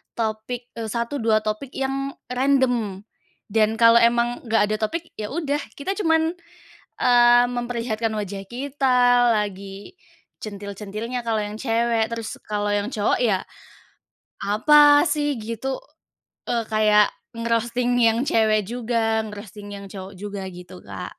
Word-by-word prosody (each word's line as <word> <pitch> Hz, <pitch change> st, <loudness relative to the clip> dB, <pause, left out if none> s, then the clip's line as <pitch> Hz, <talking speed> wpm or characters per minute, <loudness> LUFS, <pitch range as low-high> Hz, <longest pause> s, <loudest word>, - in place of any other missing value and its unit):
topik, 230 Hz, +2 st, -3 dB
eee, 225 Hz, -, -3 dB
satu 235 Hz, +5 st, -3 dB
dua 220 Hz, -2 st, +2 dB
topik 215 Hz, +5 st, -4 dB
yang 270 Hz, +1 st, -2 dB, 0.2 s
random. 250 Hz, -7 st, +1 dB, 0.5 s
Dan 220 Hz, +1 st, +2 dB
kalau 230 Hz, +1 st, +6 dB
emang 235 Hz, +1 st, +2 dB
nggak 225 Hz, -1 st, +3 dB
ada -, -, +2 dB
topik, 335 Hz, +10 st, -3 dB
ya 210 Hz, -, -3 dB
udah, 290 Hz, 0 st, -2 dB, 0.2 s
kita 330 Hz, +7 st, -3 dB
cuman, 325 Hz, -3 st, +2 dB, 0.7 s
eee, 240 Hz, 0 st, +6 dB
memperlihatkan 235 Hz, -2 st, -2 dB
wajah 200 Hz, -1 st, -5 dB
kita 265 Hz, 0 st, 0 dB, 0.3 s
lagi 200 Hz, -, -4 dB, 0.5 s
centil-centilnya 210 Hz, +3 st, -5 dB
kalau 225 Hz, -2 st, 0 dB
yang 210 Hz, 0 st, -4 dB
cewek. 230 Hz, -1 st, 0 dB
Terus 230 Hz, -1 st, -5 dB
kalau 205 Hz, -1 st, -2 dB
yang 205 Hz, +5 st, -2 dB
cowok 210 Hz, -3 st, +1 dB
ya, 200 Hz, -6 st, +2 dB, 1.0 s
apa 290 Hz, -, +6 dB
sih 290 Hz, -5 st, -1 dB
gitu, 230 Hz, +4 st, -4 dB, 0.7 s
eee, 235 Hz, -1 st, -1 dB
kayak 210 Hz, -1 st, +4 dB, 0.2 s
nge-roasting 235 Hz, +1 st, 0 dB
yang 230 Hz, 0 st, +4 dB
cewek 215 Hz, -3 st, +2 dB
juga, 225 Hz, -1 st, 0 dB
nge-roasting 210 Hz, -1 st, -9 dB
yang 200 Hz, 0 st, -8 dB
cowok 195 Hz, 0 st, -9 dB
juga, 205 Hz, -1 st, -5 dB
gitu 175 Hz, -, -12 dB
Kak. -, -, -8 dB
230 Hz, 130 wpm, -23 LUFS, 210-245 Hz, 1.0 s, kalau